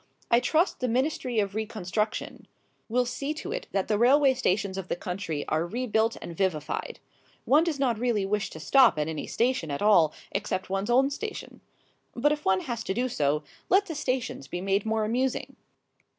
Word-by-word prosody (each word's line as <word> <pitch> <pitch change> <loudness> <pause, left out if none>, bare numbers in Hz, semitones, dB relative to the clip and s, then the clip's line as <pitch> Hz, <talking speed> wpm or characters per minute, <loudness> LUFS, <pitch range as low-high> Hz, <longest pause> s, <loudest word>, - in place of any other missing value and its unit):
I 235 - +6
trust 315 +8 +1
the 255 - 0
Ministry 255 0 -1
of 200 -2 +1
Reconstruction 215 -1 -3 0.4
will 250 +2 +2
see 275 +5 -3
to 370 - -6
it - - -4
that 195 -1 0
the 210 -1 +1
railway 270 +3 +5
stations 200 -6 0
of 190 -1 -5
the - - -1
country 180 -4 -4
are 155 +1 +1
rebuilt 225 +3 0
and 170 - -7
vivified. 160 -5 -2 0.5
One 300 +4 +5
does 335 -4 -1
not 245 -5 +1
really 230 -5 +1
wish 205 +1 -1
to 160 - -10
stop 255 - +5
at 150 0 0
any 160 -2 -4
station 235 -9 0
at 140 +6 -3
all 175 -7 +5 0.2
except 185 0 -3
one's 195 +3 -1
own 265 +3 +4
station. 425 +9 -6 0.5
But 290 +5 +2
if 300 0 -2
one 190 -1 +3
has 235 -3 -4
to 190 - -2
do 250 +2 +1
so, 150 - 0 0.3
let 390 +2 +4
the 335 - -5
stations 255 - -2
be 175 - -4
made 195 +3 0
more 220 -1 +1
amusing. 250 +4 -1
220 Hz, 190 wpm, -27 LUFS, 190-260 Hz, 0.5 s, I